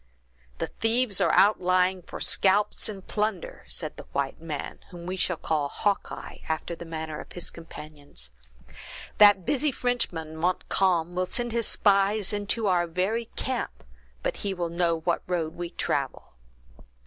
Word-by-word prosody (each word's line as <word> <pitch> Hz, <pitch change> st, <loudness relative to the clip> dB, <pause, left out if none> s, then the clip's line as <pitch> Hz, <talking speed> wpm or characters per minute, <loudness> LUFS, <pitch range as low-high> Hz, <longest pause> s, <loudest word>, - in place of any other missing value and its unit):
"The -, -, -1 dB
thieves 225 Hz, -2 st, +1 dB
are -, -, +4 dB
outlying 185 Hz, -2 st, +4 dB
for -, -, -8 dB
scalps 200 Hz, +3 st, +2 dB
and 195 Hz, -3 st, -7 dB
plunder," 210 Hz, -4 st, -2 dB
said -, -, -1 dB
the -, -, -10 dB
white 140 Hz, +2 st, -1 dB
man, 155 Hz, -3 st, -5 dB
whom 175 Hz, -1 st, -9 dB
we 185 Hz, +1 st, -2 dB
shall 180 Hz, -2 st, 0 dB
call 150 Hz, -3 st, 0 dB
Hawkeye, 205 Hz, +5 st, -2 dB
after 160 Hz, +2 st, -2 dB
the 170 Hz, -, -9 dB
manner 160 Hz, -2 st, -5 dB
of -, -, -10 dB
his 175 Hz, -, -1 dB
companions. 150 Hz, -, -10 dB, 0.9 s
"That 205 Hz, -3 st, +8 dB
busy 290 Hz, -, +1 dB
Frenchman, 180 Hz, -12 st, -1 dB
Montcalm, 175 Hz, 0 st, +1 dB
will 180 Hz, +1 st, 0 dB
send 240 Hz, +3 st, -1 dB
his 230 Hz, -1 st, 0 dB
spies 200 Hz, 0 st, +3 dB
into 205 Hz, +2 st, +1 dB
our 175 Hz, -3 st, +3 dB
very 190 Hz, +7 st, 0 dB
camp, 255 Hz, -, -3 dB, 0.4 s
but -, -, -1 dB
he 200 Hz, -2 st, -2 dB
will 175 Hz, -2 st, -2 dB
know 170 Hz, -1 st, +1 dB
what 170 Hz, +1 st, +1 dB
road 165 Hz, -3 st, -1 dB
we 175 Hz, 0 st, -5 dB
travel!" 140 Hz, -5 st, -2 dB
180 Hz, 150 wpm, -27 LUFS, 165-205 Hz, 0.9 s, That